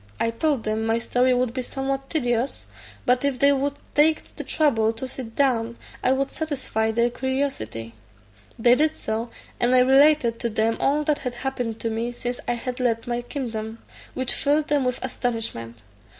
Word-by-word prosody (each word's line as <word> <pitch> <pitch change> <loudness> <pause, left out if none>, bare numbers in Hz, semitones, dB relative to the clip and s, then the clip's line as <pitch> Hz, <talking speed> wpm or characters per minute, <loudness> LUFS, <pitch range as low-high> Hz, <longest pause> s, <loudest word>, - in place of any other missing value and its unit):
I 230 - +1
told 275 +1 0
them 215 +1 -1
my 225 +1 +2
story 250 +2 +2
would 245 -1 0
be 255 - -2
somewhat 270 +1 -3
tedious, 245 -4 -1 0.4
but 250 +1 +3
if 280 -2 +1
they 280 +2 +5
would 280 +1 0 0.2
take 310 +1 +2
the - - -5
trouble 230 -8 +2
to 230 +4 -5
sit 245 -3 -7
down, 235 -4 +1 0.3
1 265 +1 +3
would 275 0 -1
satisfy 270 -8 -1
their 235 +2 +2
curiosity. 255 - -3 0.6
They 240 +1 +5
did 310 +4 +3
so, 225 +2 -3 0.3
and 245 +1 +4
I 250 - +7
related 265 -2 +5
to 235 - -1
them 220 +1 +1
all 290 +2 +2
that 300 -1 +1
had 250 -2 -4
happened 245 -3 -3
to 230 - -1
me 230 +2 -2
since 245 0 -4
I - - +2
had 245 +1 -4
left 230 -2 0
my 240 -1 -2
kingdom, 230 -4 -5 0.4
which 260 -1 0
filled 295 +1 +1
them 290 -3 +2
with 250 0 0
astonishment. 220 - -4
245 Hz, 180 wpm, -24 LUFS, 230-275 Hz, 0.6 s, I